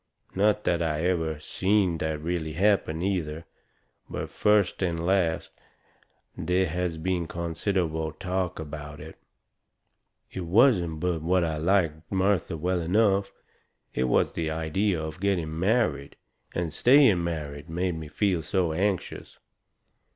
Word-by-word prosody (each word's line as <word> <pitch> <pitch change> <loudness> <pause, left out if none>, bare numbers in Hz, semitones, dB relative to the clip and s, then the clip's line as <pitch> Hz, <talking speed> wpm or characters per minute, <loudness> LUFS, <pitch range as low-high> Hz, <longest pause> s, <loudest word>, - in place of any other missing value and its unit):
Not 105 +2 +2
that 85 -1 +1
I 80 -1 -1
ever 80 -4 0
seen 95 +1 +1
that 80 -1 -2
really 80 -2 -2
happen, 90 -3 +1
either; 85 -5 -2 0.6
but - - -5
first 105 -3 +2
and 85 -2 -1
last 90 -3 +1 0.8
there 90 +1 +1
has 90 0 -2
been 85 0 -1
considerable 85 -1 -2
talk 90 +2 -3
about 75 -1 -7
it. 80 +2 -11 1.1
It 95 -2 -5
wasn't 90 - +3
but 90 -3 0
what 90 +2 +2
I 80 -2 -1
liked 85 -2 0
Martha 95 -3 +1
well 90 +3 0
enough. 100 +2 +2 0.6
It 65 - 0
was 60 - +2
the 80 -1 -2
idea 80 +4 0
of 80 0 -6
getting 85 -5 -1
married, 90 - +1 0.4
and 85 -3 -2
staying 120 - +5
married, 75 -2 -5
made 90 +2 -1
me 80 -1 -6
feel 90 +3 0
so 85 +1 0
anxious. 95 +2 -2
85 Hz, 130 wpm, -27 LUFS, 80-95 Hz, 1.1 s, staying